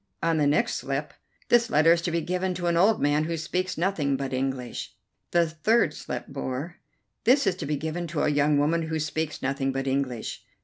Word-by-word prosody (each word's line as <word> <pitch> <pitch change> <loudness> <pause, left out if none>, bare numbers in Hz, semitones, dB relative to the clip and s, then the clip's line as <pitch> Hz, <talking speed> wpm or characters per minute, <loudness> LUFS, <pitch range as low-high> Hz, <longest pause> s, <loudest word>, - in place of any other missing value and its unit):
On 165 -1 +2
the 150 -2 +3
next 150 +12 +2
slip: - - -3 0.4
"This 240 -1 +4
letter 165 -4 +5
is 170 - 0
to 170 - -2
be 170 0 0
given 180 +2 -1
to 175 0 -4
an 170 -1 +2
old 200 +6 +4
man 145 +2 +2
who 165 0 -2
speaks 180 +4 -2
nothing 160 -6 0
but 135 -1 -4
English." 130 -2 -3 0.3
The 170 -1 +3
third 165 +2 +2
slip - - -5
bore: 135 +4 -5 0.5
"This 255 +4 +4
is 195 - +3
to 160 - -5
be 150 - 0
given 160 +4 -3
to 155 -1 -1
a - - +3
young 145 0 +3
woman 160 +3 +1
who 160 0 -1
speaks 155 0 -3
nothing 135 0 0
but 135 0 -3
English." 130 -3 -2
155 Hz, 210 wpm, -26 LUFS, 140-175 Hz, 0.5 s, letter